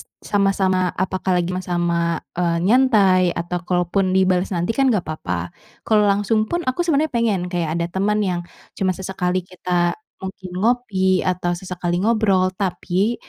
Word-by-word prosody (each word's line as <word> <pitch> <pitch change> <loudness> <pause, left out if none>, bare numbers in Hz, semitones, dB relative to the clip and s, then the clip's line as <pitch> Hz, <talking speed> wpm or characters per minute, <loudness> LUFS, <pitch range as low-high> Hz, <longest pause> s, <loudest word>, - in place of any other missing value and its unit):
s - - -12 0.2
sama-sama 195 -2 +1 0.2
apakah 185 0 0
lagi 175 0 0
ma 185 - -2
sama, 175 -1 0 0.4
eee, 170 -1 +1
nyantai 205 -5 +4
atau 175 +1 -3
kalaupun 185 +1 +1
dibales 185 -1 +2
nanti 175 +6 0
kan 270 +3 +2
nggak 210 -7 +1
papa. 90 - -4 0.3
Kalau 215 -1 +4
langsung 205 +2 +1
pun, 345 - -1
aku 255 +6 -1
sebenernya 310 -2 +1
pengen, 230 -5 +1
kayak 170 -3 -1
ada 170 - 0
temen 210 +2 +1
yang 180 -2 -1 0.4
cuma 185 -1 +1
sesekali 185 -1 -2
kita 175 -1 -1 0.3
mungkin 190 -1 -8
ngopi 195 -4 +1
atau 180 -1 0
sesekali 175 0 -3
ngobrol. 205 -4 +2
Tapi, 190 +3 0
185 Hz, 155 wpm, -21 LUFS, 180-205 Hz, 0.4 s, nyantai